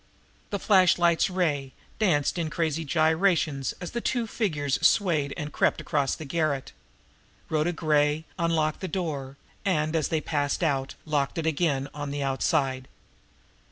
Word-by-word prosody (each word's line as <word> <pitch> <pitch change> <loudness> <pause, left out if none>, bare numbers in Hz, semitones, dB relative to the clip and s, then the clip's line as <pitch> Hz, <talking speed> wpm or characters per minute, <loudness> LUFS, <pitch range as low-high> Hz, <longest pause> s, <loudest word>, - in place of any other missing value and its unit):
The 200 - -1
flashlight's 180 -3 +4
ray 150 -8 -1 0.3
danced 175 -6 +2
in 160 -2 -1
crazy 160 0 -1
gyrations 160 -2 +1
as 180 -2 -6
the 235 - -3
two 240 -1 0
figures 150 - -1
swayed 165 -5 +3
and 150 -2 -5
crept - - +2
across 145 -4 0
the 160 - -8
garret. 150 -3 -1 0.8
Rhoda 155 +2 +1
Gray 155 -1 +1
unlocked 160 -2 +1
the 190 - -4
door, 150 -7 -4 0.3
and, 155 -4 0
as 155 -3 +1
they 160 - 0
passed 145 +1 -1
out, 135 -4 0
locked 145 -2 -1
it 165 - -2
again 150 -4 +1
on 145 -1 -5
the 140 0 -3
outside. 135 -1 0
155 Hz, 145 wpm, -27 LUFS, 145-170 Hz, 0.8 s, flashlight's